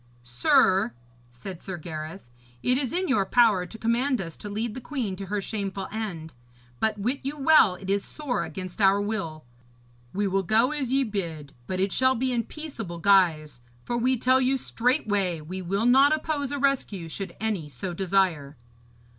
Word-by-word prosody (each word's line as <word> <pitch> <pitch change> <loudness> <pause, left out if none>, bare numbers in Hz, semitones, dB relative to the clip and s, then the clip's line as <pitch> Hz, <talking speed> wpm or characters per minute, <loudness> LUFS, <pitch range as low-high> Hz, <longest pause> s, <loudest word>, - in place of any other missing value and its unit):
'Sir,' 125 +6 +3 0.4
said 165 +9 -9
Sir 190 -2 -5
Gareth, 155 -3 -8 0.3
'it 250 - +3
is 260 -2 0
in 370 +2 0
your 235 -9 +2
power 205 -4 +3
to 225 - -10
command 240 +4 +1
us 165 -4 -5
to 205 - -7
lead 215 +2 -2
the 260 - -7
queen 240 -9 -3
to 195 +1 -7
her 210 +1 -1
shameful 195 -1 -4
end; 190 -8 -5 0.5
but 220 -1 +1
wit 245 +7 -1
you 280 +3 -4
well 275 -9 +5
it 190 +1 -10
is 200 0 +1
sore 290 -5 -3
against 185 +1 -6
our 195 0 +5
will. 195 - -3 0.7
We 205 +2 -1
will 195 0 +1
go 220 - +3
as 280 -5 -2
ye 270 +1 +3
bid, 170 - -5
but 185 - -3
it 195 +1 +1
shall 260 0 +3
be 260 +2 0
in 235 -3 0
peaceable 235 - -7
guise, 165 -8 +3 0.2
for 240 - -2
we 250 +2 +2
tell 255 +3 +3
you 265 +1 +2
straightway, 205 -9 0
we 180 +5 -6
will 195 +5 -1
not 270 +5 +6
oppose 295 -3 -3
a 285 - -2
rescue, 265 -11 0
should 195 +4 -6
any 205 -8 -2
so 160 +7 -5
desire.' 175 -6 0
200 Hz, 180 wpm, -26 LUFS, 180-250 Hz, 0.7 s, not